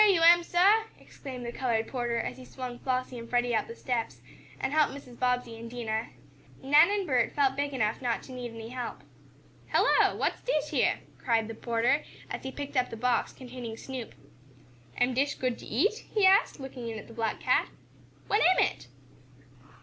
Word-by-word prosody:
"Heah 405 Hz, -2 st, +6 dB
you 330 Hz, -, +1 dB
am, 345 Hz, +1 st, +8 dB
sah!" 395 Hz, +6 st, +4 dB
exclaimed 255 Hz, -3 st, -9 dB
the 235 Hz, -, -3 dB
colored 235 Hz, -3 st, 0 dB
porter 240 Hz, -2 st, -2 dB
as -, -, -4 dB
he 260 Hz, -, -10 dB
swung 250 Hz, -1 st, -7 dB
Flossie 255 Hz, -1 st, -2 dB
and 230 Hz, 0 st, -9 dB
Freddie 245 Hz, 0 st, +1 dB
up -, -, 0 dB
the 230 Hz, -, -8 dB
steps, 235 Hz, -3 st, -3 dB, 0.4 s
and 265 Hz, -, -2 dB
helped 305 Hz, -3 st, +3 dB
Mrs. 250 Hz, -4 st, -12 dB
Bobbsey 250 Hz, -2 st, 0 dB
and 230 Hz, 0 st, -8 dB
Dinah. 225 Hz, -2 st, -3 dB, 0.6 s
Nan 295 Hz, +6 st, +6 dB
and 405 Hz, -1 st, 0 dB
Bert 255 Hz, -7 st, +1 dB
felt 270 Hz, -2 st, +2 dB
big 285 Hz, +1 st, -1 dB
enough 225 Hz, -4 st, -1 dB
not 240 Hz, -2 st, -1 dB
to -, -, -11 dB
need 250 Hz, -1 st, -5 dB
any 225 Hz, 0 st, -8 dB
help. 250 Hz, -1 st, -5 dB, 0.7 s
"Hello! -, -, +4 dB
What's -, -, -1 dB
dish -, -, -1 dB
yeah?" -, -, +3 dB, 0.2 s
cried 225 Hz, -3 st, +1 dB
the 225 Hz, -, -6 dB
porter, 235 Hz, +5 st, +1 dB, 0.3 s
as -, -, -4 dB
he 265 Hz, -, -5 dB
picked 285 Hz, +1 st, -7 dB
up 255 Hz, -1 st, +2 dB
the 230 Hz, -, -7 dB
box 245 Hz, +1 st, +1 dB
containing 245 Hz, -3 st, -8 dB
Snoop. 255 Hz, -2 st, -7 dB, 0.8 s
"Am 250 Hz, +1 st, +2 dB
dish 275 Hz, +3 st, +1 dB
good 255 Hz, -2 st, -2 dB
to -, -, -10 dB
eat?" 390 Hz, -, +1 dB
he 415 Hz, -2 st, +5 dB
asked, 385 Hz, -3 st, +4 dB
looking 265 Hz, -3 st, -7 dB
in 225 Hz, -, -5 dB
at -, -, -9 dB
the 230 Hz, -, -12 dB
black 225 Hz, -1 st, -2 dB
cat. -, -, +2 dB, 0.6 s
"What 420 Hz, -, +2 dB
am 370 Hz, +1 st, +5 dB
it?" -, -, -5 dB
250 Hz, 195 wpm, -29 LUFS, 235-285 Hz, 0.8 s, am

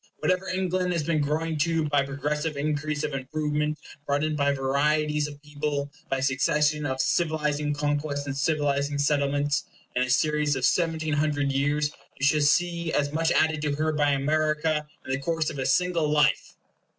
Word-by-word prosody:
Whatever 185 Hz, +1 st, 0 dB
England 185 Hz, -1 st, 0 dB
has 165 Hz, -3 st, -1 dB
been 155 Hz, 0 st, +1 dB
growing 155 Hz, +2 st, -1 dB
to 165 Hz, 0 st, +1 dB
by 145 Hz, -1 st, +3 dB
a -, -, -2 dB
progressive 150 Hz, +2 st, -2 dB
increase 150 Hz, +1 st, -1 dB
of 150 Hz, -1 st, -2 dB
improvement, 150 Hz, +2 st, -2 dB, 0.3 s
brought 145 Hz, +1 st, +1 dB
in 155 Hz, 0 st, 0 dB
by 140 Hz, -1 st, +2 dB
varieties 150 Hz, +2 st, +1 dB
of 145 Hz, -1 st, -10 dB
people, 145 Hz, -1 st, -3 dB, 0.2 s
by 135 Hz, -, 0 dB
succession 150 Hz, +3 st, +1 dB
of 130 Hz, -1 st, -3 dB
civilizing 150 Hz, -1 st, 0 dB
conquests 145 Hz, -1 st, -1 dB
and 140 Hz, -1 st, -4 dB
civilizing 145 Hz, -1 st, 0 dB
settlements 145 Hz, 0 st, +1 dB, 0.3 s
in 125 Hz, -, +2 dB
a 125 Hz, -, 0 dB
series 150 Hz, +2 st, +2 dB
of 130 Hz, -, 0 dB
seventeen 160 Hz, -3 st, +1 dB
hundred 145 Hz, -1 st, +1 dB
years, 145 Hz, +2 st, +1 dB, 0.3 s
you 135 Hz, -, +1 dB
shall 150 Hz, +1 st, +3 dB
see 170 Hz, +2 st, +2 dB
as 145 Hz, 0 st, 0 dB
much 165 Hz, +1 st, +1 dB
added 160 Hz, -1 st, +2 dB
to 150 Hz, -1 st, -1 dB
her 155 Hz, +1 st, 0 dB
by 150 Hz, -1 st, +2 dB
America 155 Hz, +2 st, +1 dB, 0.2 s
in -, -, -4 dB
the 130 Hz, -, 0 dB
course 160 Hz, +2 st, -1 dB
of 140 Hz, -, -7 dB
a 130 Hz, -, -1 dB
single 180 Hz, -4 st, +2 dB
life!" 150 Hz, 0 st, +2 dB
150 Hz, 175 wpm, -26 LUFS, 145-155 Hz, 0.3 s, by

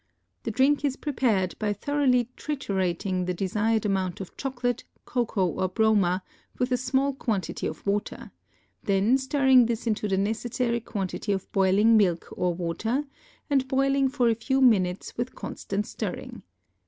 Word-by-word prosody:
The -, -, -4 dB
drink 275 Hz, +5 st, +2 dB
is 280 Hz, -2 st, +1 dB
prepared 230 Hz, -, 0 dB
by 210 Hz, -1 st, 0 dB
thoroughly 255 Hz, +1 st, +1 dB
triturating 190 Hz, -, -2 dB
the 180 Hz, -, -1 dB
desired 215 Hz, +4 st, 0 dB
amount 190 Hz, -3 st, -1 dB
of 195 Hz, -, -8 dB
chocolate, 245 Hz, -3 st, -2 dB, 0.2 s
cocoa 230 Hz, -6 st, 0 dB
or 180 Hz, +2 st, -1 dB
broma 195 Hz, -3 st, +2 dB, 0.3 s
with 250 Hz, +1 st, -1 dB
a 250 Hz, -, +3 dB
small 265 Hz, +3 st, +1 dB
quantity 215 Hz, -9 st, -2 dB
of 155 Hz, -, -7 dB
water, 205 Hz, +1 st, -2 dB, 0.5 s
then 200 Hz, +5 st, +3 dB
stirring 265 Hz, -2 st, +4 dB
this 235 Hz, 0 st, -2 dB
into 215 Hz, -2 st, 0 dB
the 195 Hz, -1 st, 0 dB
necessary 235 Hz, +4 st, -1 dB
quantity 205 Hz, -2 st, -4 dB
of 190 Hz, -2 st, -3 dB
boiling 200 Hz, +4 st, +4 dB
milk 180 Hz, -5 st, +2 dB
or 180 Hz, -1 st, 0 dB
water 185 Hz, -, -2 dB, 0.4 s
and 270 Hz, -3 st, +1 dB
boiling 275 Hz, 0 st, +2 dB
for 260 Hz, -3 st, +1 dB
a 230 Hz, -, +4 dB
few 265 Hz, +4 st, 0 dB
minutes 195 Hz, -8 st, +2 dB
with 245 Hz, +2 st, -3 dB
constant 205 Hz, +1 st, -4 dB
stirring. -, -, -6 dB
225 Hz, 150 wpm, -26 LUFS, 195-260 Hz, 0.5 s, stirring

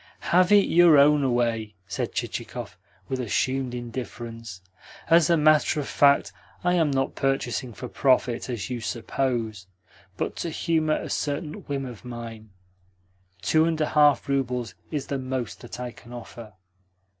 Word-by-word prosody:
"Have 180 Hz, +2 st, +5 dB
it 205 Hz, -1 st, +7 dB
your 170 Hz, -3 st, +6 dB
own 145 Hz, +1 st, +5 dB
away," 115 Hz, -4 st, 0 dB
said -, -, -3 dB
Chichikov, -, -, -5 dB, 0.3 s
with 130 Hz, -, -3 dB
assumed 130 Hz, +2 st, -1 dB
indifference. 115 Hz, -4 st, -7 dB, 0.5 s
"As 165 Hz, -1 st, +6 dB
a 170 Hz, -, +5 dB
matter 155 Hz, 0 st, +4 dB
of 145 Hz, -, -3 dB
fact, 140 Hz, -8 st, +3 dB, 0.3 s
I 180 Hz, 0 st, +2 dB
am 165 Hz, -4 st, +3 dB
not 135 Hz, -1 st, 0 dB
purchasing 135 Hz, -2 st, -1 dB
for 125 Hz, +3 st, -7 dB
profit, 130 Hz, -1 st, +1 dB
as 115 Hz, -7 st, -3 dB
you 120 Hz, -2 st, -3 dB
suppose, 115 Hz, -4 st, -2 dB, 0.5 s
but -, -, -2 dB
to 170 Hz, -, -3 dB
humour 155 Hz, -1 st, +1 dB
a -, -, -5 dB
certain 150 Hz, +1 st, -3 dB
whim 140 Hz, -2 st, -2 dB
of 120 Hz, -4 st, -9 dB
mine. 115 Hz, -3 st, -8 dB, 0.9 s
Two 160 Hz, 0 st, +4 dB
and 165 Hz, -1 st, 0 dB
a 155 Hz, -, +1 dB
half 145 Hz, -2 st, +4 dB
roubles 125 Hz, -4 st, -1 dB, 0.2 s
is 150 Hz, -3 st, -3 dB
the 140 Hz, -, -3 dB
most 130 Hz, -1 st, -4 dB
that 120 Hz, 0 st, -9 dB
I 125 Hz, -1 st, -4 dB
can 120 Hz, +1 st, -16 dB
offer." 115 Hz, -2 st, -10 dB
130 Hz, 155 wpm, -25 LUFS, 120-150 Hz, 0.9 s, it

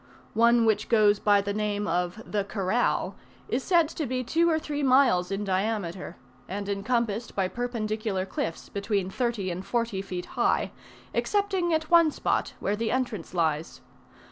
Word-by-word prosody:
One 235 Hz, +1 st, +4 dB
which 215 Hz, -1 st, +1 dB
goes 210 Hz, -3 st, +4 dB
by 205 Hz, -1 st, +4 dB
the 200 Hz, 0 st, -3 dB
name 210 Hz, -1 st, -1 dB
of 180 Hz, +5 st, -1 dB
the 205 Hz, -1 st, -1 dB
"Corral," 200 Hz, +3 st, 0 dB, 0.3 s
is 260 Hz, +2 st, -1 dB
said 340 Hz, -4 st, +4 dB
to 310 Hz, -3 st, -4 dB
be 255 Hz, +1 st, -1 dB
two 330 Hz, +7 st, +2 dB
or 320 Hz, -, +3 dB
three 295 Hz, -2 st, -3 dB
miles 255 Hz, -10 st, +4 dB
in 195 Hz, +1 st, -2 dB
diameter, 195 Hz, -2 st, -2 dB, 0.3 s
and 200 Hz, +1 st, -4 dB
encompassed 220 Hz, +2 st, -1 dB
by 195 Hz, -2 st, +1 dB
perpendicular 215 Hz, -4 st, -2 dB
cliffs, 165 Hz, -3 st, -4 dB
between 200 Hz, -2 st, -2 dB
thirty 230 Hz, -5 st, -1 dB
and 180 Hz, +2 st, -5 dB
forty 230 Hz, -3 st, -1 dB
feet 180 Hz, -2 st, -5 dB
high, -, -, +1 dB, 0.4 s
excepting 390 Hz, -4 st, 0 dB
at 315 Hz, +1 st, 0 dB
one 335 Hz, -2 st, +7 dB
spot, -, -, -1 dB
where 205 Hz, -, 0 dB
the 225 Hz, +1 st, -2 dB
entrance 230 Hz, -9 st, -2 dB
lies. 160 Hz, -2 st, -1 dB
215 Hz, 160 wpm, -27 LUFS, 195-250 Hz, 0.4 s, one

